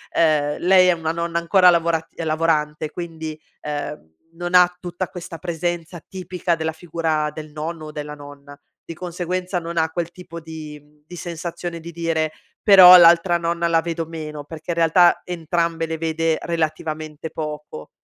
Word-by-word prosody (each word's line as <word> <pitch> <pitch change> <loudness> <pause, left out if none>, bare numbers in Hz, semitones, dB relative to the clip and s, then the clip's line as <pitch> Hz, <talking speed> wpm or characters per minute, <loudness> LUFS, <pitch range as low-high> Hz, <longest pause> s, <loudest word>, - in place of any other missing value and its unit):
ehm, 150 -3 +2
lei 185 +1 +6
è 180 - +5
una 160 -1 -2
nonna 170 0 -2
ancora 180 +2 +5
lavorat 165 -2 +1 0.2
lavorante 155 -1 0
quindi, 160 -2 -7 0.2
ehm, 145 - -6 0.2
non 175 +2 -6
ha 180 0 +6
tutta 180 0 -5
questa 175 -1 -8
presenza 175 0 -4
tipica 180 -2 -2
della 160 0 -2
figura 160 -2 -2
del 155 0 -9
nonno 155 +1 -5
o 155 - -8
della 150 0 -6
nonna; 145 -1 -12 0.3
di - - -7
conseguenza 180 +1 -3
non 170 0 -7
ha 160 0 +2
quel 170 0 -3
tipo 175 -2 -10
di 155 -2 -9
mhmm, 150 +1 -28
di 175 - -10
sensazione 170 0 -6
di 170 +1 -9
dire: 165 -2 -1 0.3
"Però 185 -3 +10
l'altra 170 0 +6
nonna 170 0 -1
la 165 -1 +3
vedo 165 0 -3
meno." 155 -2 -7
Perché 160 +2 -11
in 170 - 0
realtà 170 +1 +4
entrambe 170 -1 -1
le 160 0 -3
vede, 160 0 0
relativamente, 155 -1 -3
poco. 150 - -7
165 Hz, 165 wpm, -21 LUFS, 155-175 Hz, 0.3 s, Però